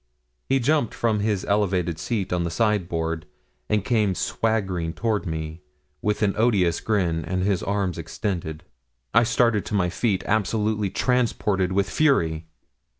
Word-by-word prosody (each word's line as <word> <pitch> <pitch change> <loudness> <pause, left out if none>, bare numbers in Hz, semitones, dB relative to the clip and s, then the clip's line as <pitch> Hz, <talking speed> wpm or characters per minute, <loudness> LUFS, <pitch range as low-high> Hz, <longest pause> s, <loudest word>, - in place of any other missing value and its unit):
He 135 - +4
jumped 140 -1 +1
from 110 -3 +1
his 105 -2 0
elevated 95 -5 0
seat 105 -7 -2
on 90 -1 +1
the 85 - -1
sideboard, 85 -5 -1 0.4
and 105 -2 +1
came 105 -6 +2
swaggering 95 -8 -1
toward 110 -3 -1
me, 80 0 -4 0.4
with 105 0 0
an 100 -2 +2
odious 105 -7 +3
grin, 90 -7 0
and 90 +4 -2
his 100 -2 +1
arms 100 -3 -1
extended. 85 -5 -4 0.5
I 115 - +6
started 115 -2 +2
to 105 - -3
my 90 -3 +1
feet, 100 -1 0
absolutely 105 -1 0
transported 105 -6 +1
with 100 +1 +1
fury. 85 - +1
100 Hz, 145 wpm, -24 LUFS, 90-110 Hz, 0.5 s, I